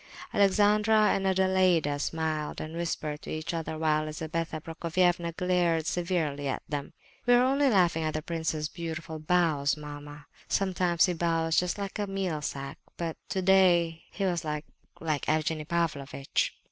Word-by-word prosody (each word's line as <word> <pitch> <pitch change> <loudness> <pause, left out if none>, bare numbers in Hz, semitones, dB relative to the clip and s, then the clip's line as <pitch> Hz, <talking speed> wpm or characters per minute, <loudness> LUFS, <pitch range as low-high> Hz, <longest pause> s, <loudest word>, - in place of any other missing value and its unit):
Alexandra 210 +2 +4
and 195 0 0
Adelaida 185 -6 +3
smiled 155 0 -2
and 155 +1 -6
whispered 155 -3 -3
to - - -9
each 155 +2 -3
other, 160 -1 -3
while 155 -1 +1
Lizabetha 160 +1 -3
Prokofievna 170 +2 0
glared 175 -3 +1
severely 165 -6 -1
at 135 - -2
them. 145 -2 -4 0.3
"We 245 - +7
are 245 - +5
only 275 +2 +3
laughing 175 -7 +3
at 155 -1 -1
the 155 - -2
prince's 160 -2 -2
beautiful 165 -1 -6
bows, 155 -3 +2
mamma," 145 -1 -9 0.2
said 195 -1 +1
Adelaida. - - -5
"Sometimes 175 -2 +4
he 180 - 0
bows 165 -1 0
just 180 +2 -1
like 200 0 -5
a 205 - -1
meal 190 -6 -2
sack, 140 0 -5 0.2
but 165 -2 -3
to 190 - -1
day 175 -3 +4
he 195 - -3
was 175 -3 0
like—like 150 0 -4
Evgenie 155 0 0
Pavlovitch!" 150 -5 -1
165 Hz, 160 wpm, -29 LUFS, 155-180 Hz, 0.3 s, We